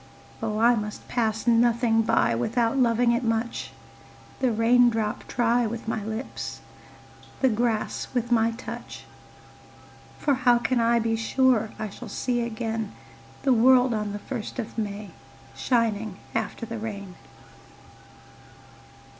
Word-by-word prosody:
Oh 215 -1 -2
I 235 +2 +5
must 210 -2 -4
pass 220 -3 -1
nothing 235 -1 +3
by 220 - +2
Without 230 - 0
loving 240 -2 +3
it 235 +2 0
much, 225 +1 -1 0.7
The 255 -2 +2
raindrop 225 -1 +2
try 240 0 +2
with 230 +1 -6
my 220 -2 -2
lips, 220 +4 -5 0.8
The 265 - +5
grass 225 -1 -1
with 245 -1 -2
my 225 -1 +4
touch; 230 +2 -8 1.1
For 290 - +1
how 250 -2 +4
can 245 +1 0
I 235 +1 +3
be 225 0 +1
sure 225 -1 +2
I 215 - -4
shall 240 +2 -9
see 240 +3 -1
again 225 -2 -3 0.5
The 270 -2 +4
world 250 +1 +5
on 210 -1 -2
the 205 - -4
first 235 +2 -6
of 235 -4 -5
May 205 -3 -4 0.4
Shining 220 -5 0 0.2
after 225 +1 -3
the 230 0 -6
rain? 200 -4 -6
230 Hz, 130 wpm, -26 LUFS, 220-240 Hz, 1.1 s, I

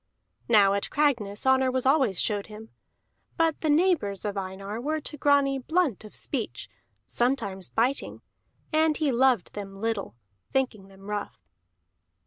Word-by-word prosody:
Now 205 -4 +6
at 200 - -1
Cragness 245 -9 0
honor 265 0 +4
was 255 0 0
always 265 - +3
showed 205 -2 0
him; 220 +1 -11 0.7
but 325 -2 +1
the 315 - 0
neighbors 295 - +2
of 205 -1 -2
Einar 195 +3 -5
were 310 +4 -1
to 300 - -5
Grani 280 -1 +3
blunt 315 - 0
of 215 - -12
speech, - - -4 0.4
sometimes 225 -7 -1
biting; 255 +5 -1 0.5
and 315 -1 +3
he 300 -3 +1
loved 250 -4 +2
them 195 -1 -7
little, 220 - -2 0.4
thinking 245 -7 -1
them 195 0 -17
rough. 210 -1 -5
240 Hz, 140 wpm, -27 LUFS, 200-280 Hz, 0.7 s, Now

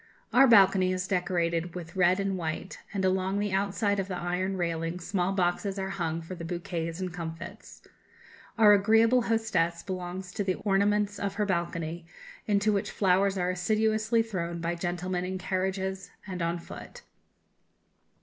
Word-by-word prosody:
Our 265 +2 +7
balcony 195 -4 +6
is 185 0 -2
decorated 175 -2 0
with 175 -1 -7
red 185 0 +4
and 195 -1 0
white, 170 +1 -4
and 195 -2 -1
along 190 +1 +1
the 205 0 -1
outside 200 +1 0
of 195 - -2
the 185 -2 -4
iron 180 +2 -2
railing 165 0 -2
small 180 0 -1
boxes 190 +1 0
are 190 0 -3
hung 165 -4 -2
for 165 - -7
the 170 -2 -7
bouquets 165 0 -4
and 185 -2 -4
comfits. 170 +4 -8 0.7
Our 210 -2 +8
agreeable 225 +4 +4
hostess 215 -8 0
belongs 185 0 -5
to 205 - -2
the 185 -2 0
ornaments 205 0 +1
of 200 -1 -2
her 210 - +1
balcony, 170 -2 -2 0.4
into 205 0 +2
which 200 - -1
flowers 195 0 +2
are 180 0 +1
assiduously 220 +4 +1
thrown 170 -6 -4
by 170 +1 -1
gentlemen 180 +1 -2
in 185 +1 -3
carriages 190 0 -2 0.2
and 185 -2 -5
on 170 +1 0
foot. 480 - -10
185 Hz, 160 wpm, -28 LUFS, 175-200 Hz, 0.7 s, Our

